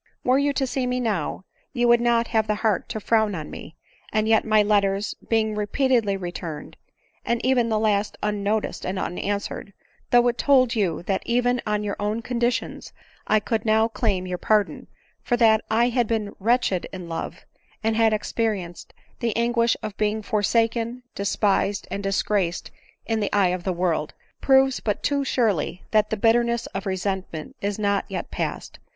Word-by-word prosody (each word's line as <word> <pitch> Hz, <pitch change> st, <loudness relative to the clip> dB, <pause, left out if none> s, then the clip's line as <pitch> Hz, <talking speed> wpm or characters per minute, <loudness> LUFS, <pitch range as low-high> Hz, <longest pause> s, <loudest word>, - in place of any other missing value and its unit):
Were 255 Hz, +2 st, +3 dB
you 285 Hz, 0 st, +2 dB
to 275 Hz, -, 0 dB
see 255 Hz, 0 st, -2 dB
me 250 Hz, 0 st, -1 dB
now, 200 Hz, -6 st, -2 dB, 0.3 s
you 240 Hz, -2 st, +2 dB
would 240 Hz, 0 st, +5 dB
not 235 Hz, -1 st, +2 dB
have 220 Hz, -2 st, +1 dB
the 210 Hz, -, +1 dB
heart 210 Hz, -5 st, +1 dB
to 220 Hz, -, -3 dB
frown 220 Hz, -1 st, +1 dB
on 155 Hz, -2 st, -6 dB
me; 160 Hz, -, -9 dB, 0.4 s
and 215 Hz, 0 st, +1 dB
yet 220 Hz, -1 st, +4 dB
my 215 Hz, -1 st, +4 dB
letters, 200 Hz, -1 st, +1 dB, 0.2 s
be 225 Hz, -1 st, +4 dB
ing 220 Hz, 0 st, -2 dB
repeatedly 210 Hz, 0 st, +1 dB
returned, 175 Hz, -4 st, -6 dB, 0.5 s
and 235 Hz, 0 st, 0 dB
even 250 Hz, -3 st, +3 dB
the 220 Hz, -, +1 dB
last 210 Hz, -1 st, 0 dB
unnoticed 210 Hz, +1 st, -1 dB
and 185 Hz, +1 st, -3 dB
unanswered, 200 Hz, +2 st, -3 dB, 0.4 s
though 245 Hz, 0 st, +5 dB
it 240 Hz, 0 st, 0 dB
told 260 Hz, -4 st, +4 dB
you 190 Hz, -8 st, 0 dB
that 190 Hz, +1 st, -1 dB
even 245 Hz, +1 st, +1 dB
on 210 Hz, 0 st, 0 dB
your 205 Hz, -1 st, -3 dB
own 210 Hz, +3 st, -2 dB
conditions 240 Hz, 0 st, -2 dB, 0.3 s
I 215 Hz, -, +4 dB
could 220 Hz, 0 st, -2 dB
now 220 Hz, 0 st, +3 dB
claim 205 Hz, -5 st, -1 dB
your 180 Hz, -1 st, -4 dB
pardon, 210 Hz, -2 st, +1 dB, 0.3 s
for 240 Hz, -, 0 dB
that 220 Hz, -2 st, +4 dB
I 235 Hz, +2 st, +3 dB
had 240 Hz, -2 st, +1 dB
been 215 Hz, -3 st, -2 dB
* -, -, -41 dB
wretched 225 Hz, -3 st, +1 dB
in 180 Hz, -2 st, -7 dB
love,' 165 Hz, -1 st, -6 dB, 0.4 s
and 220 Hz, 0 st, +1 dB
had 225 Hz, 0 st, +4 dB
experienced 210 Hz, -5 st, -3 dB
' -, -, -35 dB
the 230 Hz, -3 st, -1 dB
an 235 Hz, +1 st, +1 dB
guish 235 Hz, -1 st, +3 dB
of 215 Hz, -2 st, -5 dB
being 215 Hz, 0 st, 0 dB
forsaken, 230 Hz, +3 st, 0 dB
despised, 200 Hz, 0 st, 0 dB
and 200 Hz, -, -3 dB
disgraced 195 Hz, -2 st, -1 dB, 0.3 s
in 225 Hz, -1 st, 0 dB
the 205 Hz, -, -1 dB
eye 200 Hz, -3 st, +3 dB
of 180 Hz, -1 st, -3 dB
the 190 Hz, -, +1 dB
world,' 170 Hz, -4 st, -1 dB, 0.3 s
proves 265 Hz, -1 st, +4 dB
but 210 Hz, -2 st, -2 dB
too 285 Hz, -1 st, +1 dB
surely 205 Hz, -, 0 dB
that 215 Hz, -1 st, +3 dB
the 220 Hz, -, -1 dB
bitter 230 Hz, +3 st, +4 dB
ness 235 Hz, 0 st, -1 dB
of 195 Hz, +1 st, -4 dB
resentment 190 Hz, -4 st, -3 dB
is 200 Hz, 0 st, -2 dB
not 200 Hz, -1 st, 0 dB
yet -, -, -5 dB
past -, -, -4 dB
215 Hz, 185 wpm, -24 LUFS, 200-235 Hz, 0.5 s, would